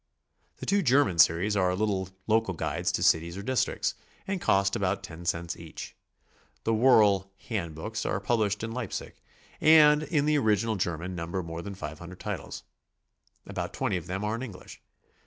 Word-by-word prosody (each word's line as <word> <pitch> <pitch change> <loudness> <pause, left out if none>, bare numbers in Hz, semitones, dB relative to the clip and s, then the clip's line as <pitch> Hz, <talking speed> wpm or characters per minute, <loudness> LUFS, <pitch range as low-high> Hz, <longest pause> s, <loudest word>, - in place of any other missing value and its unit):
The - - -7
two 200 0 +2
German 135 - +3
series 90 +6 +4
are 90 -2 +2
little 95 -2 -1 0.2
local 110 -4 +1
guides - - -1
to - - 0
cities 85 +2 +2
or 100 - -6
districts, 130 +3 0 0.3
and 195 -2 -3
cost 100 - +2
about 95 0 -1
ten 85 +1 -9
cents 85 0 -1
each. 85 -2 -9 0.7
The 115 - +1
Woerl 105 -5 +4 0.2
"hand 85 -9 -3
books" 110 +8 -4
are 95 - -1
published 105 0 0
in 115 - -3
Leipsic, 120 -4 -5 0.4
and 150 -1 +7
in 155 -2 0
the 150 -1 +3
original 110 -1 +1
German 90 -1 -2
number 85 +2 -3
more 85 0 -6
than 100 +2 -7
500 85 +1 -8
titles. - - -5 0.8
About - - -5
20 - - 0
of 90 -1 -4
them 95 +3 -3
are 105 +1 -1
in 115 - -3
Eng 125 -6 -6
lish. 90 - -13
100 Hz, 175 wpm, -28 LUFS, 90-115 Hz, 0.8 s, and